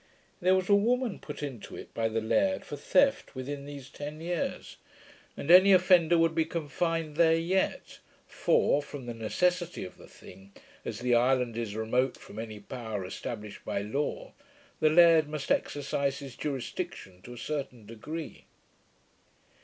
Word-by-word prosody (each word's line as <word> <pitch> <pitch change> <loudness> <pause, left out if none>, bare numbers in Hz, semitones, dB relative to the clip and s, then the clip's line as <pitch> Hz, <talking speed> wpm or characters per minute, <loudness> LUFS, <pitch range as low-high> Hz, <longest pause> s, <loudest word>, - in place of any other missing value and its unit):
There 185 +1 +4
was 185 -1 0
a 205 - +4
woman 235 +2 +2
put 150 - -8
into 130 -7 -6
it - - -10
by 115 -1 0
the 115 0 -1
laird, 280 - +1
for - - -6
theft, 275 - +2
within 140 +2 -5
these 140 -2 -8
ten 145 +3 -7
years; 170 +1 -3 0.6
and 150 - 0
any 190 +2 +9
offender 175 -2 +5
would 165 -1 +3
be 160 0 +2
confined 165 0 -2
there 165 -1 +5
yet; 180 +4 -1 0.3
for, 145 - +2
from 145 -3 -9
the 120 - -5
necessity 175 +10 -1
of 90 - -11
the - - -13
thing, 95 +2 -15 0.3
as - - -5
the 125 0 +2
island 125 -1 +2
is 115 -3 -4
remote 125 +4 0
from 105 - -11
any 110 -2 -6
power 105 -2 -5
established 105 +2 -7
by 100 - -2
law, 135 +8 -3 0.5
the 155 - +4
laird 165 -2 +6
must 150 -2 -4
exercise 140 -1 0
his 135 -3 -9
jurisdiction 120 -9 -5
to 120 - -10
a - - -11
certain 130 -5 -5
degree. 150 +9 -7
145 Hz, 160 wpm, -29 LUFS, 120-170 Hz, 0.6 s, any